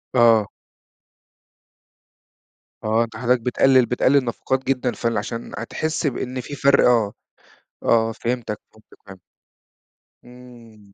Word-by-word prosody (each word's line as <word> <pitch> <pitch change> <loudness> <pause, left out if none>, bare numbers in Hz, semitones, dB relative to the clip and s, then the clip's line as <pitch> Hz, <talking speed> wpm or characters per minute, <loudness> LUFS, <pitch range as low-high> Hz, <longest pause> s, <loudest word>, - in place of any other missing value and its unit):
آه. 115 -3 +5 2.4
آه 110 +2 +2
أنت 115 -1 -8
حضرتك 125 0 +1
بتقلل 130 +1 +3
بتقلل 130 +2 +2
نفقات 130 +3 -2
جدًا 130 -2 0
فال 115 -2 -2
عشان 115 +3 -5
هتحس 155 +7 -2
بإن 130 -1 -3
في 145 - -8
فرق 140 +1 +4
آه، 115 -4 +2 0.7
آه 115 -1 +2
فهمتك، 115 -2 -4
فهمتك، 110 0 -21
فهمتك. 95 -2 -12 1.1
امم. 120 -5 -16
120 Hz, 110 wpm, -22 LUFS, 115-130 Hz, 2.4 s, آه